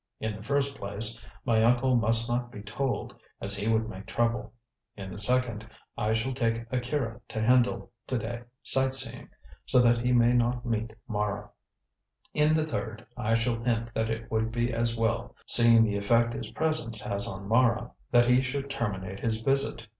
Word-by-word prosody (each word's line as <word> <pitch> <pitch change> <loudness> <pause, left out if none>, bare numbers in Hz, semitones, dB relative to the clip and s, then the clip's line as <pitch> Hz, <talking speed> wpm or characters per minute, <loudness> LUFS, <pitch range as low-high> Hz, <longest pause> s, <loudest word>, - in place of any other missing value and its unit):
"In 110 -1 -3
the 100 - -10
first 140 +4 -1
place, 110 +3 +2 0.2
my 115 -3 +2
uncle 125 +2 +3
must 115 0 +3
not 120 0 -2
be 105 - -10
told, 130 +6 -3 0.3
as 100 +1 +4
he 105 +2 0
would 110 0 +1
make 100 -1 -9
trouble. 120 +1 -1 0.5
In 95 -2 -8
the - - -8
second, 115 -1 +1 0.3
I 110 +1 0
shall 120 +4 -2
take 115 -2 -1
Akira 125 -2 -3
to - - -5
Hendle 120 +1 +1 0.2
to 130 - -1
day 115 +1 -5 0.2
sightseeing, 135 0 +3 0.4
so 130 - +6
that 120 0 +3
he 125 +1 0
may 120 0 +4
not 120 0 0
meet 115 -1 -2 0.2
Mara. 105 -2 -3 0.8
In 150 +1 +3
the 155 -1 +1
third, 115 -6 -5
I 110 +2 0
shall 115 0 -1
hint 115 -1 -1
that 110 0 -1
it 115 0 -5
would 110 0 -1
be 120 +1 -1
as 115 0 -1
well, 115 +1 -2
seeing 115 -1 +6
the 105 -2 0
effect 115 +3 +2
his - - -6
presence 155 -8 -1
has 100 0 +2
on 95 0 -6
Mara, 115 +1 +2 0.2
that 120 0 +4
he 125 +1 +4
should 135 +1 -4
terminate 95 -6 -4
his 115 -1 -1
visit. 135 0 0
115 Hz, 180 wpm, -27 LUFS, 110-125 Hz, 0.8 s, so